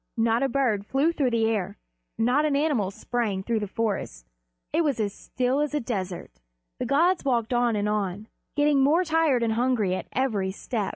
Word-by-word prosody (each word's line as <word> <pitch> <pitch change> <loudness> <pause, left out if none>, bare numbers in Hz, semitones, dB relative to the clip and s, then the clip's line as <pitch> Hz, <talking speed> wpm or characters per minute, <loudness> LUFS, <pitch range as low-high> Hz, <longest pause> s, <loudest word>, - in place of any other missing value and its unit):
Not 225 +1 +2
a 270 - +1
bird 240 -7 +1
flew 275 +9 +1
through 275 -6 +1
the 230 -2 +1
air, 215 -5 -1 0.4
not 250 +6 +2
an 300 -2 +1
animal 280 -10 +1
sprang 205 -2 -2
through 230 +1 0
the 210 - -3
trees. 195 - -3 0.5
It 330 - +3
was 285 -6 0
as 205 -2 -1
still 255 +5 -1
as 300 0 -1
a - - +2
desert. 185 - -5 0.4
The - - -2
gods 335 +7 +3
walked 245 -4 0
on 240 -2 +2
and 205 0 0
on, 210 0 -2 0.3
getting 290 -1 +3
more 310 +7 +4
tired 320 -7 +2
and 225 -1 +1
hungry 230 -5 +1
at 185 - -4
every 220 -8 0
step. 205 +1 -3
235 Hz, 190 wpm, -26 LUFS, 210-275 Hz, 0.5 s, more